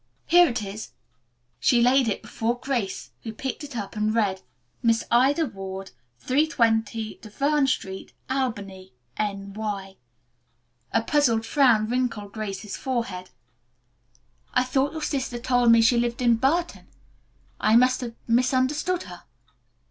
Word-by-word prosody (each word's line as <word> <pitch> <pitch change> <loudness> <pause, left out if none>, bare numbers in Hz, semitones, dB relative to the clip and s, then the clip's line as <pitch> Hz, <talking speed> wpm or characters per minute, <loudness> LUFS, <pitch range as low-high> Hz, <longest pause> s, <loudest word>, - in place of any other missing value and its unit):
"Here 350 +1 +6
it 235 -5 -2
is." 200 -2 -7 0.7
She 240 - +3
laid 250 +1 +4
it 215 - -2
before 235 +2 -2
Grace, 240 -7 -3
who 225 - -6
picked 265 +6 -5
it 285 -4 -7
up 205 0 -5
and 215 +1 0
read, 195 -4 +1 0.4
"Miss 230 -2 +2
Ida 275 +7 +4
Ward, 195 -4 -7 0.3
320 230 - 0
Duverne 275 +6 +1
Street, 190 -7 -3 0.2
Albany, 200 -8 -3 0.2
N.Y." 200 -1 -4 0.9
A - - +1
puzzled 235 -6 +2
frown 230 -4 +3
wrinkled 230 -4 -2
Grace's 210 -1 -5
forehead. 230 -8 -3 1.3
"I 250 - +4
thought 265 +3 0
your 315 -1 -5
sister 260 -4 -2
told 245 -1 +3
me 230 0 +6
she 235 +1 +4
lived 240 +1 -1
in 235 -2 +4
Burton. 325 +8 0 0.7
I 215 +1 +3
must 255 +2 +4
have 235 -2 -6
misunderstood 260 +8 +1
her." 175 -2 -11
235 Hz, 130 wpm, -25 LUFS, 210-260 Hz, 1.3 s, Here